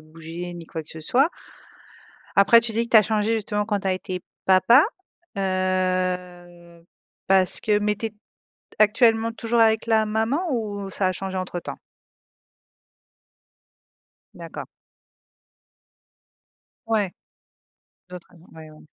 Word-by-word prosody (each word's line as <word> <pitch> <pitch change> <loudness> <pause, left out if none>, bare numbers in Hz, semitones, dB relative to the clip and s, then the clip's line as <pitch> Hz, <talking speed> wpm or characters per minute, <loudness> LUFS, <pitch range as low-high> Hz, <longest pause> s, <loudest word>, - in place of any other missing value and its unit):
bouger, 165 +3 -8
ni 170 -1 -10
quoi 160 - -6
que 155 - -20
ce 160 - -9
soit. 260 - +2 1.1
Après, 200 +4 +7
tu 230 -1 -2
dis 230 +2 0
que - - -19
tu 235 - +7
as 215 - +8
changé, 215 +1 0
justement, 210 -1 -1
quand 205 -2 -1
tu 195 - -6
as 190 - +2
été 185 0 -5 0.2
papa, 190 +8 +6 0.6
heu, 180 -2 -2 0.4
parce 190 -2 +3
que, 210 -1 +2
mais 210 0 0
tu 225 +2 -4
es 220 - -7 0.7
actuellement 225 +1 +3
toujours 230 +1 -1
avec 220 -1 +3
la 220 -1 +3
maman 220 +7 0
ou 205 -4 -4
ça 190 0 0
a - - +1
changé 190 +1 -5
entre 185 -1 -4
temps? - - -8 2.6
D'accord. - - -8 2.2
Ouais, 210 -5 0 1.0
d'autres 180 -1 -10
raisons. 175 -1 -20
Ouais 160 -1 -12
ouais. 155 0 -16
195 Hz, 135 wpm, -23 LUFS, 180-220 Hz, 2.6 s, as